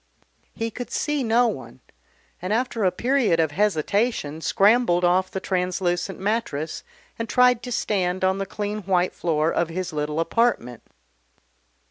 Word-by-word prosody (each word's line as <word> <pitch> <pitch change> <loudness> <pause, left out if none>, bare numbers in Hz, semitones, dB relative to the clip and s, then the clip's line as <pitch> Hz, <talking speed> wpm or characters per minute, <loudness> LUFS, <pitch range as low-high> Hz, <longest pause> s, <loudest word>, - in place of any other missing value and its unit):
He 225 0 -3
could 245 +3 -6
see 295 -1 -1
no 235 +1 +3
one, 130 - -6 0.6
and 185 +3 -3
after 230 -1 0
a 185 - +3
period 235 -4 +1
of 160 -2 +2
hesitation 195 -2 0
scrambled 195 -2 +3
off 185 +2 +2
the 190 - -4
translucent 180 0 -1
mattress 190 -7 -2 0.4
and 230 - -3
tried 250 -1 +4
to 245 0 -7
stand 185 -5 -1
on 190 +1 +2
the 195 - -3
clean 210 +2 -4
white 185 -2 +1
floor 160 -1 0
of 170 - 0
his 180 0 -4
little 150 +1 -2
apartment. 165 - 0
190 Hz, 145 wpm, -24 LUFS, 170-230 Hz, 0.6 s, tried